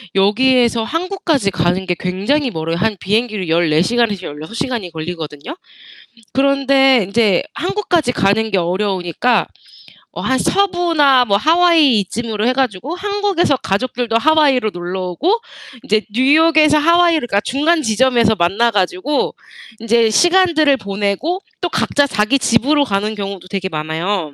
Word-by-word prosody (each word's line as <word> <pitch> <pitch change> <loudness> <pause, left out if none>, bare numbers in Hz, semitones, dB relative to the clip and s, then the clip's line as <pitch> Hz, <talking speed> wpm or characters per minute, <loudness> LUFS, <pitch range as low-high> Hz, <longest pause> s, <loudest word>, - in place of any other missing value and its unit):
여기에서 235 +4 +2
한국까지 330 - -2
가는 185 +1 -1
게 180 -1 -1
굉장히 220 - -1
멀어요. 160 -1 -3
한 210 +4 -1
비행기로 215 -1 -2
14 160 -1 +2
시간에서 215 -3 0
16 150 +7 -9
시간이 230 -9 -4
걸리거든요? 160 - -7 0.8
그런데 270 -2 +3
인제 200 -1 +1
한국까지 355 -8 -1
가는 220 +2 0
게 195 - 0
어려우니까 185 +5 -1 0.7
어 - - -6
한 260 0 0
서부나 335 -9 +2
뭐 200 -3 +2
하와이 320 -4 +3
이쯤으로 220 +2 -4
해 250 - +3
가지고 260 - -2
한국에서 400 -6 0
가족들도 235 +2 -2
하와이로 280 -6 +2
놀러 175 +2 -5
오고 355 - 0 0.4
인제 215 -5 +1
뉴욕에서 305 +5 +3
하와이를 335 -3 +2
그러니까 200 - +1
중간 310 +5 +1
지점에서 230 -1 +2
만나 200 +6 +1
가지고 200 +8 -1 0.4
인제 230 0 +2
시간들을 340 -1 +3
보내고 200 - -3 0.2
또 355 - -1
각자 285 -3 0
자기 230 +2 0
집으로 275 +6 +2
가는 210 -3 -2
경우도 195 -2 -7
되게 190 -1 -4
많아요. 160 +1 -3
235 Hz, 335 characters per minute, -16 LUFS, 195-295 Hz, 0.8 s, 그런데